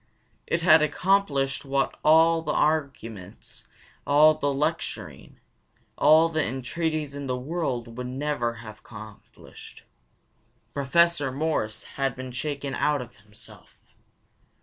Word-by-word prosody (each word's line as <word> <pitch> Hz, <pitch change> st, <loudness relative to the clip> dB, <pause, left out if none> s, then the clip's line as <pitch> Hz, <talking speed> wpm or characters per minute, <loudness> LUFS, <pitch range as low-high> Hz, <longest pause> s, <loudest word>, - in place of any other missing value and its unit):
It 170 Hz, -1 st, -1 dB
had 160 Hz, -2 st, +7 dB
accomplished 155 Hz, -4 st, +1 dB
what 135 Hz, -1 st, -1 dB
all 165 Hz, +1 st, +5 dB
the 155 Hz, -, -2 dB
arguments, 135 Hz, -11 st, -3 dB, 0.4 s
all 150 Hz, +2 st, +6 dB
the 145 Hz, -2 st, -1 dB
lecturing, 150 Hz, +4 st, -4 dB, 0.6 s
all 160 Hz, +2 st, +5 dB
the 160 Hz, -2 st, -1 dB
entreaties 150 Hz, +4 st, -3 dB
in 140 Hz, -1 st, -6 dB
the 125 Hz, -1 st, -1 dB
world 125 Hz, -5 st, -4 dB
would 125 Hz, -, -4 dB
never 130 Hz, -3 st, -2 dB
have 110 Hz, 0 st, -10 dB
accomplished. 110 Hz, -2 st, -13 dB, 0.9 s
Professor 145 Hz, 0 st, +2 dB
Morris 135 Hz, -7 st, -2 dB
had 135 Hz, -2 st, -3 dB
been 130 Hz, 0 st, -7 dB
shaken 140 Hz, +1 st, -4 dB
out 145 Hz, -2 st, 0 dB
of 120 Hz, -, -16 dB
himself. 105 Hz, +1 st, -15 dB
140 Hz, 115 wpm, -25 LUFS, 125-155 Hz, 0.9 s, had